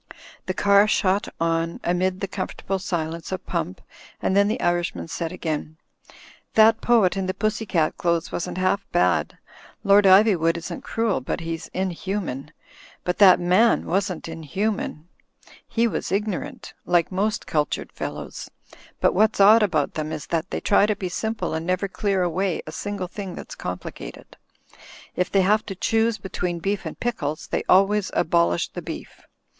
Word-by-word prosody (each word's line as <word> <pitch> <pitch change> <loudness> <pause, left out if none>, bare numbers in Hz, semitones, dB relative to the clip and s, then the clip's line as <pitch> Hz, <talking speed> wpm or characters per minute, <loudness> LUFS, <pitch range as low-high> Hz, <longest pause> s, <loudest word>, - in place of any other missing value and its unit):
The 185 - -2
car 200 +1 +5
shot 200 -1 +1
on 165 0 0
amid 185 +2 0
the 195 - -1
comfortable 190 0 -4
silence 165 -3 -3
of 185 - -4
Pump, 165 - -3 0.4
and 190 - 0
then 200 0 +5
the 215 - -1
Irishman 175 - -1
said 165 - -4
again: 155 -3 -4 0.8
"That 220 0 +6
poet 225 -7 +3
in 190 -1 -2
the 185 - -2
pussy 215 0 -1
cat 160 -4 +1
clothes 170 -1 0
wasn't 175 - -4
half 185 +2 +1
bad. 175 - +1 0.5
Lord 200 0 +5
Iv3nvood 190 -4 +5
isn't 170 - -6
cruel; 225 - -1
but 135 - -3
he's 165 0 -5
inhuman. 185 -6 -3 0.5
But 180 - -2
that 190 -3 +8
man 185 +7 +3
wasn't 185 -2 -1
inhuman. 165 +1 -3 0.6
He 235 +1 +1
was 220 - -3
ignorant, 200 -1 -3
like 175 0 +2
most 205 +3 -1
cultured 150 -2 -1
fellows. - - -6 0.5
But - - +3
what's 215 +3 +2
odd 215 +3 +8
about 160 -9 +1
them 155 0 -3
is 150 - -5
that 170 +3 -2
they - - -3
try 200 0 +4
to 215 - +1
be 190 -2 -4
simple 220 -1 -3
and 160 0 -2
never 185 +2 0
clear 195 -1 0
away 180 +1 -1
a 155 - -7
single 205 +2 -4
thing 190 -1 -7
that's - - -8
complicated. - - -7 0.8
If 180 +1 -1
they 195 - +4
have 210 +3 +3
to 195 - -5
choose 225 +3 +1
be 190 -1 -9
tween 175 -1 -2
beef 200 +4 -2
and - - -8
pickles, 155 -11 -2
they - - -2
always 195 +2 +4
abolish 85 - +2
the - - -7
beef. - - -8
185 Hz, 165 wpm, -24 LUFS, 170-205 Hz, 0.8 s, that